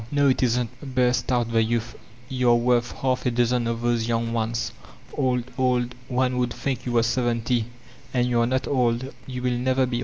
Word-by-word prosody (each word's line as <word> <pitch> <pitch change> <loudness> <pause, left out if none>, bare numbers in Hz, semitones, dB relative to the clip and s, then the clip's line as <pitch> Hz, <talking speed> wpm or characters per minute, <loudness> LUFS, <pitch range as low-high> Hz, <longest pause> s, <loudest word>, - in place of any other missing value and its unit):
•*No, 145 -1 +4
it 130 - +1
isn't," 125 +2 -1
burst 125 -1 +2
out 120 -2 +1
the 115 -1 +3
youth. 115 +1 -1 0.4
'Tou're 125 -2 +3
worth 120 0 +2
half 130 -1 -1
a - - +4
dozen 120 0 +1
of 115 0 -2
those 120 -1 +1
young 115 0 0
ones. 115 0 -1 0.4
Old, 125 -3 +1 0.2
old— 125 -1 +1
one 125 -1 0
would 125 -1 0
think 130 -2 -3
you 120 - -1
were 115 -1 +4
seventy. 120 -1 0 0.5
And 125 -1 +1
you're 120 -1 +2
not 130 +1 0
old; 125 0 0
you 125 -1 -5
will 125 - +1
never 130 +1 +2
beoU." 120 -1 -2
125 Hz, 190 wpm, -24 LUFS, 115-125 Hz, 0.5 s, No